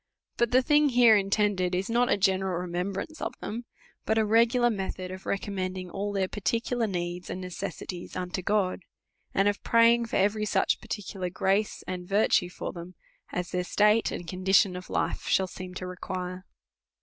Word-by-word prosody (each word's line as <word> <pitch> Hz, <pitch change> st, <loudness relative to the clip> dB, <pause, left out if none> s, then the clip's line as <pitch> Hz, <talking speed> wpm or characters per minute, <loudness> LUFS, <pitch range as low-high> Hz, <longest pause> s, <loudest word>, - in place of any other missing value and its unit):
But 235 Hz, -, +2 dB
the 255 Hz, +2 st, +4 dB
thing 295 Hz, +1 st, +4 dB
here 240 Hz, -3 st, +6 dB
intended 195 Hz, -2 st, +1 dB
is 185 Hz, +2 st, -1 dB
not 240 Hz, +1 st, +2 dB
a -, -, +3 dB
general 190 Hz, -2 st, +1 dB
remembrance 180 Hz, -, -4 dB
of -, -, -3 dB
them, 235 Hz, +3 st, -5 dB, 0.4 s
but 220 Hz, -, +1 dB
a 220 Hz, -, +3 dB
regular 235 Hz, +2 st, +4 dB
metiiod 190 Hz, -2 st, -4 dB
of 190 Hz, 0 st, -10 dB
recommending 185 Hz, -2 st, -3 dB
all 205 Hz, +1 st, -3 dB
their 195 Hz, -2 st, 0 dB
particular 230 Hz, +5 st, -1 dB
needs 175 Hz, -2 st, -4 dB
and -, -, -4 dB
necessities 180 Hz, -1 st, -6 dB
unto 185 Hz, 0 st, -3 dB
God; 195 Hz, -1 st, 0 dB, 0.5 s
and 195 Hz, +1 st, +3 dB
of 205 Hz, 0 st, 0 dB
praying 230 Hz, 0 st, +4 dB
for -, -, -4 dB
every 210 Hz, +2 st, +2 dB
such -, -, +1 dB
particular 190 Hz, -3 st, -4 dB
g 180 Hz, -, -21 dB
race 200 Hz, +3 st, +1 dB
and 180 Hz, -1 st, -5 dB
virtue 195 Hz, -3 st, +3 dB
for -, -, -6 dB
them, 175 Hz, +1 st, -9 dB, 0.4 s
as 180 Hz, 0 st, -3 dB
their 180 Hz, -1 st, 0 dB
state 210 Hz, +4 st, +3 dB
and 175 Hz, -, -6 dB
condition 185 Hz, +1 st, +3 dB
of 180 Hz, 0 st, -8 dB
life -, -, -2 dB
shall 190 Hz, -, +3 dB
see.n 185 Hz, 0 st, -8 dB
to 185 Hz, -, -5 dB
require. 180 Hz, 0 st, -5 dB
195 Hz, 175 wpm, -28 LUFS, 180-215 Hz, 0.5 s, here